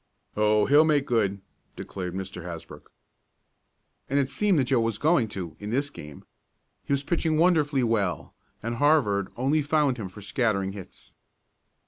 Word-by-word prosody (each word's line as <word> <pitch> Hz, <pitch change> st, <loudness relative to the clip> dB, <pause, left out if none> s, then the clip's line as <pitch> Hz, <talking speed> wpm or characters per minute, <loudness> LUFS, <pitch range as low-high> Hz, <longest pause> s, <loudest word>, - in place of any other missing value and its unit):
"Oh, 105 Hz, 0 st, +3 dB
he'll 145 Hz, +2 st, +6 dB
make 150 Hz, -3 st, +2 dB
good!" 100 Hz, -6 st, 0 dB, 0.3 s
declared 90 Hz, -2 st, -6 dB
Mr. 95 Hz, -1 st, -6 dB
Hasbrook. 85 Hz, -3 st, -9 dB, 1.2 s
And 140 Hz, -, +1 dB
it 135 Hz, -1 st, +1 dB
seemed 200 Hz, +5 st, +2 dB
that 140 Hz, -, +3 dB
Joe 130 Hz, -1 st, +1 dB
was 115 Hz, -2 st, 0 dB
going 145 Hz, -3 st, +2 dB
to 90 Hz, -6 st, -6 dB
in 105 Hz, -, -6 dB
this 140 Hz, +5 st, -1 dB
game. 75 Hz, -, -11 dB, 0.6 s
He -, -, -7 dB
was 140 Hz, 0 st, +1 dB
pitching 160 Hz, 0 st, 0 dB
wonderfully 155 Hz, -5 st, +3 dB
well, 105 Hz, -6 st, -1 dB, 0.3 s
and 115 Hz, +1 st, -3 dB
Harvard 120 Hz, -10 st, +2 dB
only 140 Hz, +5 st, +1 dB
found 145 Hz, -3 st, +1 dB
him 100 Hz, -5 st, -5 dB
for 105 Hz, +3 st, -12 dB
scattering 100 Hz, -3 st, 0 dB
hits. 95 Hz, -2 st, -11 dB
120 Hz, 155 wpm, -26 LUFS, 100-145 Hz, 1.2 s, he'll